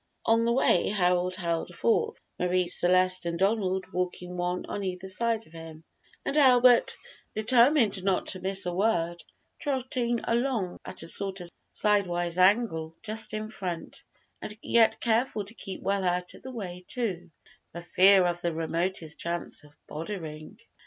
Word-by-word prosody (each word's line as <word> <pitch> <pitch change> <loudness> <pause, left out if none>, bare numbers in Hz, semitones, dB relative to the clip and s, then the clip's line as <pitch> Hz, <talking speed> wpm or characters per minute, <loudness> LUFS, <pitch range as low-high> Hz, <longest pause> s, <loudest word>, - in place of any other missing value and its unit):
On 230 +1 +3
the 235 - +2
way 235 -7 +3
Harold 180 -2 +1
held 170 -1 -3
forth, 450 - +1 0.2
Marie 180 0 +1
Celeste 185 +1 +2
and 170 0 -2
Donald 190 -1 +1
walking 180 0 -3
one 180 0 -2
on 205 - -5
either 185 0 -4
side 225 +3 -1
of 160 - -21
him, 165 -1 -10 0.4
and - - -1
Albert, 250 -3 +6 0.4
determined 235 -2 +3
not 190 -1 +1
to 185 - -2
miss 190 0 0
a 175 - -2
word, 175 -4 0 0.4
trotting 255 -4 -1
along 230 -6 -1
at - - -5
a - - -7
sort 195 +2 -3
of 175 -1 -9 0.2
sidewise 175 -4 +1
angle 185 -5 +2
just 220 +1 -4
in 215 0 -3
front, 185 -6 -5 0.4
and 210 - -4
yet 225 -1 +4
careful 225 -2 +1
to 210 - -7
keep 195 -4 -8
well 195 0 0
out 180 0 0
of - - -14
the 260 - -8
way, 180 -7 -7
too, 190 -8 -2 0.4
for 170 - -7
fear 190 +1 +5
of 175 0 -1
the 170 -2 -1
remotest 165 0 -2
chance 170 -2 -3
of 145 0 -18
"boddering." 155 -2 -7
185 Hz, 160 wpm, -28 LUFS, 175-220 Hz, 0.4 s, Albert